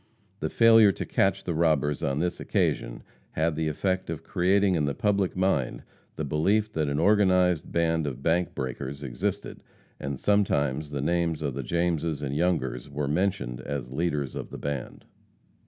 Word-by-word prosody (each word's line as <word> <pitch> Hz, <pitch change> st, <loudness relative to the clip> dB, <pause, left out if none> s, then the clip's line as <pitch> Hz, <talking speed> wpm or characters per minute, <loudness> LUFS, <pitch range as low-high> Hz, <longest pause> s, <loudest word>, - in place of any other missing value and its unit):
The -, -, -2 dB
failure 115 Hz, -3 st, +6 dB
to -, -, -5 dB
catch 95 Hz, 0 st, +1 dB
the 85 Hz, -, -2 dB
robbers 75 Hz, -3 st, +1 dB
on 70 Hz, 0 st, -1 dB
this 85 Hz, +3 st, -1 dB
occasion -, -, -1 dB, 0.3 s
had 80 Hz, 0 st, 0 dB
the 80 Hz, 0 st, -1 dB
effect 95 Hz, +4 st, -1 dB
of 80 Hz, -3 st, -4 dB
creating 95 Hz, +2 st, +2 dB
in 80 Hz, -4 st, +1 dB
the 70 Hz, -2 st, -2 dB
public 100 Hz, -1 st, 0 dB
mind 95 Hz, -9 st, 0 dB, 0.3 s
the 80 Hz, -, -3 dB
belief 100 Hz, +9 st, +1 dB
that 75 Hz, -2 st, 0 dB
an 70 Hz, -, -1 dB
organized 90 Hz, -2 st, +3 dB
band 80 Hz, -2 st, +1 dB
of 70 Hz, -1 st, -5 dB
bank 85 Hz, +2 st, +1 dB
breakers 70 Hz, +1 st, -5 dB
existed, 95 Hz, +10 st, -4 dB, 0.4 s
and 70 Hz, -1 st, -4 dB
sometimes 75 Hz, -8 st, +1 dB
the 70 Hz, -2 st, -3 dB
names 85 Hz, 0 st, 0 dB
of 70 Hz, -3 st, -1 dB
the 70 Hz, -, -3 dB
Jameses 80 Hz, 0 st, -1 dB
and 70 Hz, 0 st, -3 dB
Youngers 75 Hz, -6 st, -1 dB
were 70 Hz, 0 st, -3 dB
mentioned 75 Hz, -7 st, -1 dB
as 65 Hz, -2 st, -5 dB
leaders 75 Hz, -3 st, -1 dB
of -, -, -6 dB
the -, -, -8 dB
band. 70 Hz, -3 st, -5 dB
80 Hz, 170 wpm, -27 LUFS, 70-90 Hz, 0.4 s, failure